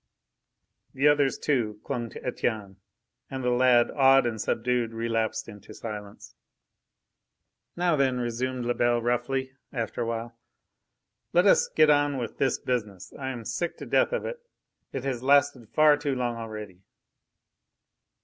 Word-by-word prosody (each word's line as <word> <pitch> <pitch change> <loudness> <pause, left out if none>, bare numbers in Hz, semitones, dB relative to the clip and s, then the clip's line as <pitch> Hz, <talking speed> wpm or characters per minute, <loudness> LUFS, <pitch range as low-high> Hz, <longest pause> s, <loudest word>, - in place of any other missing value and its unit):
The 135 +2 +3
others, 145 -2 +3
too, 115 -8 -1
clung 120 -4 -3
to - - -11
Etienne, 110 -6 -2 0.5
and 130 -1 -5
the 125 - +1
lad, 120 -1 +4
awed 135 -1 +5
and 110 -3 -2
subdued, 120 0 -1
relapsed 115 -1 -1
into 105 -3 -12
silence. 105 -3 -8 1.4
"Now 175 -2 +2
then," 135 -3 +1
resumed 125 +1 -2
Lebel 120 0 +2
roughly, 125 +3 -1 0.2
after 115 -4 -3
a 115 - -1
while, 115 0 -4 1.0
"let 175 +2 +4
us 200 - +5
get 155 -1 +4
on 145 -1 +2
with 120 -3 -5
this 135 -3 +2
business. 105 -7 -4
I 130 -1 -5
am 120 -4 -6
sick 160 +10 -3
to - - -8
death - - +2
of - - -2
it. - - -5 0.5
It 135 - -4
has 130 -3 -2
lasted 140 -3 +3
far 155 -1 +5
too 145 -2 -2
long 120 -2 -1
already." 105 -5 -8
125 Hz, 145 wpm, -27 LUFS, 115-135 Hz, 1.4 s, awed